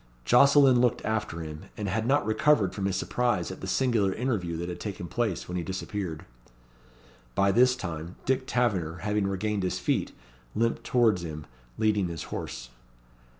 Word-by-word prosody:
Jocelyn 135 - +6
looked 125 -2 +1
after 105 -6 -2
him, 75 -1 -7
and 105 - -3
had 110 +4 -1
not 140 -4 +3
recovered 110 -3 +3
from 100 - -3
his 95 - -1
surprise 105 -2 0
at 95 - -9
the 95 - -5
singular 110 -3 +2
interview 100 -8 -2
that 85 +1 -4
had 90 - -5
taken 100 -4 -5
place 110 -5 -2
when 90 - -3
he 85 - -2
disappeared. 95 -2 -4 1.1
By 100 0 +3
this 125 +4 +5
time, 85 -5 -6
Dick 130 0 0
Taverner 90 -9 0
having 105 0 0
regained 100 +1 -1
his 90 - -1
feet, - - 0 0.4
limped 115 +1 0
towards 115 -7 +3
him, 75 -2 -6 0.3
leading 105 -4 +2
his 85 -2 -5
horse. - - -5
100 Hz, 165 wpm, -28 LUFS, 90-120 Hz, 1.1 s, Jocelyn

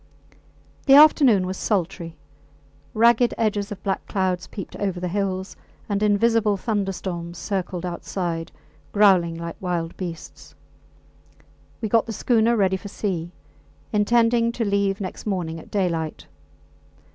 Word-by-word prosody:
The 270 - +8
afternoon 280 -9 +6
was 185 +1 -4
sultry. 170 -4 -2 0.8
Ragged 235 +2 +4
edges 210 -2 -1
of 200 -2 -7
black 195 - -2
clouds 185 -2 -1
peeped 200 - -8
over 195 -3 -2
the 180 - -3
hills, 190 0 -2 0.3
and 205 -1 -1
invisible 210 0 +3
thunderstorms 190 -5 -3
circled 185 -1 -3
outside, 170 -1 -4 0.4
growling 190 -5 +4
like 170 0 -6
wild 175 -3 -2
beasts. 170 -3 -8 1.3
We 220 - -1
got 225 +2 +2
the 225 - -4
schooner 230 +1 +2
ready 190 -2 +2
for 205 - -9
sea, 180 -4 -3 0.6
intending 230 +2 +3
to 235 -1 -2
leave 200 -1 +1
next 185 +2 -6
morning 170 -5 -2
at - - -14
daylight. 170 -6 -2
195 Hz, 125 wpm, -23 LUFS, 180-215 Hz, 1.3 s, The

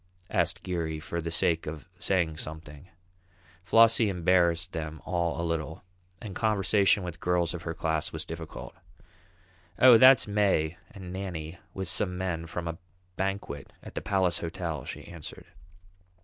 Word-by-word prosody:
asked - - 0
Geary 85 -4 -2
for 85 +1 -4
the 85 - -3
sake 80 -1 +1
of 80 +2 -6
saying 85 -5 +1
something. 75 +1 -8 0.7
Flossie 115 +2 +5
embarrassed 90 -1 +2
them 80 -1 -5
all 85 -2 -1
a 85 - -1
little, 80 -1 -3 0.4
and 100 0 -7
conversation 100 -1 +3
with 85 -2 -6
girls 90 -2 +1
of 85 - -5
her 80 -1 -4
class 80 0 -1
was 80 -1 -5
difficult. 80 -1 -8 1.0
"Oh, 125 -3 +8
that's 130 -3 +8
May 95 -6 +1
and 95 -3 -9
Nannie 90 -3 -5 0.2
with 95 -1 -3
some 90 +1 0
men 85 -3 -3
from 85 +1 -4
a 85 0 -5 0.4
banquet 95 -7 -3
at - - -10
the - - -4
Palace 95 -3 +1
Hotel," 85 -2 -4
she - - -7
answered. 85 -4 -9
85 Hz, 150 wpm, -28 LUFS, 80-95 Hz, 1.0 s, Oh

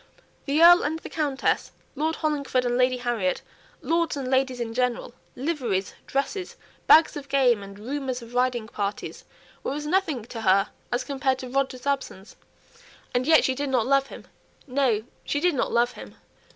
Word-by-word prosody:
The 300 +3 +3
Earl 350 +1 +9
and 310 +3 -1
the - - -10
Countess, 290 -4 0 0.2
Lord 315 +3 0
Hollingford 280 -5 0
and 245 0 0
Lady 255 0 +3
Harriet, 235 -7 -1 0.4
lords 335 -2 0
and 270 -2 -4
ladies 260 -1 +1
in 230 -1 -3
general, 250 -1 -1 0.2
liveries, 250 - -2
dresses, 280 +8 -2 0.3
bags 320 +1 +7
of 285 -2 -7
game, 255 -6 +3
and 200 0 -10
rumours 255 +2 -4
of 235 +1 -13
riding 245 -2 0
parties, 205 -2 -5 0.4
were 275 - -2
as 300 0 -5
nothing 310 - 0
to 230 -1 -7
her 195 -1 +3 0.4
compared 270 -2 0
to 255 -1 -7
Roger's 265 -1 -1
absence. 270 -8 -3 0.8
And 250 +2 0
yet 320 -1 +6
she 260 - +2
did 280 +2 -3
not 250 -4 +2
love 275 0 +3
him. - - -11 0.4
No, 255 -6 +1 0.2
she 290 - -1
did 355 +2 +2
not 265 - -1
love 240 +1 +2
him. - - -11
260 Hz, 170 wpm, -25 LUFS, 240-290 Hz, 0.8 s, Earl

